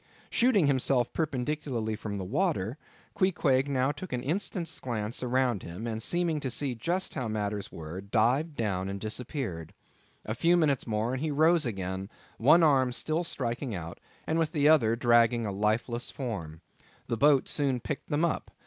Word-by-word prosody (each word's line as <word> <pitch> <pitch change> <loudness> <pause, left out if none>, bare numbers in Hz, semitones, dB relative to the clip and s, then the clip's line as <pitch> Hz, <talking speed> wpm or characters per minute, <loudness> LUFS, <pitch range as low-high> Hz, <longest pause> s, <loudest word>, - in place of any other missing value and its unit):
Shooting 230 -8 +4
himself 130 -2 +2
perpendicularly 135 -6 -2
from 105 -1 -5
the 95 - -4
water, 140 - -1 0.3
Queequeg, 145 -8 +2
now 135 0 +1
took 150 +6 -8
an 125 -1 -2
instant's 165 0 -2
glance 115 -3 -3
around 125 -4 +1
him, 90 +7 -7
and 110 -1 -3
seeming 170 +3 0
to 135 - -3
see 130 +1 -1
just 175 +11 -2
how 130 -5 -3
matters 105 -2 -3
were, 80 +3 -7
dived 125 +10 +1
down 95 -5 -1
and 100 0 -4
disappeared. 110 - -4 0.5
A 110 - -2
few 170 +9 +3
minutes 145 -7 +1
more, 110 +2 -1
and 130 - -3
he 155 - -1
rose 155 +1 +3
again, 95 -2 -4 0.3
one 155 +8 +6
arm 135 -5 +4
still 155 +7 -1
striking 120 - -3
out, 85 -1 -7 0.3
and 160 +1 0
with 165 0 0
the 145 -2 +3
other 120 -8 +5
dragging 120 -1 +3
a 100 - -2
lifeless 110 +4 -1
form. 90 - -5 0.4
The - - -2
boat 140 +2 +4
soon 135 -4 +1
picked 135 +5 -5
them 155 +2 +2
up. 170 - -2
125 Hz, 170 wpm, -29 LUFS, 110-150 Hz, 0.5 s, one